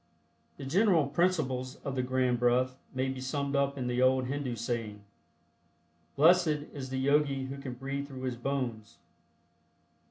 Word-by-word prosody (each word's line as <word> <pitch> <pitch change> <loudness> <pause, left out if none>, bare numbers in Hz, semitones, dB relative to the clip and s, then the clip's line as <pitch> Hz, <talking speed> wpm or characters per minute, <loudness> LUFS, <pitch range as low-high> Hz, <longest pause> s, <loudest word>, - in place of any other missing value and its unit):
The 140 - -7
general 175 +1 +3
principles 140 -5 0
of 140 - -2
the 130 - 0
Grand 125 -1 +1
Breath 125 +1 +2 0.2
may 130 +1 -1
be 130 -1 -5
summed 140 +1 -2
up 140 0 +1
in 130 - -3
the 125 0 0
old 130 0 +4
Hindu 135 -2 -3
saying: 115 -3 -4 1.1
"Blessed 175 +4 +6 0.3
is 135 -2 -6
the 130 - -3
Yogi 140 0 +2
who 135 +1 -6
can 135 -2 -6
breathe 140 +3 -4
through 130 -2 -8
his 130 -2 -2
bones." 120 -4 -3
130 Hz, 155 wpm, -30 LUFS, 125-140 Hz, 1.1 s, Blessed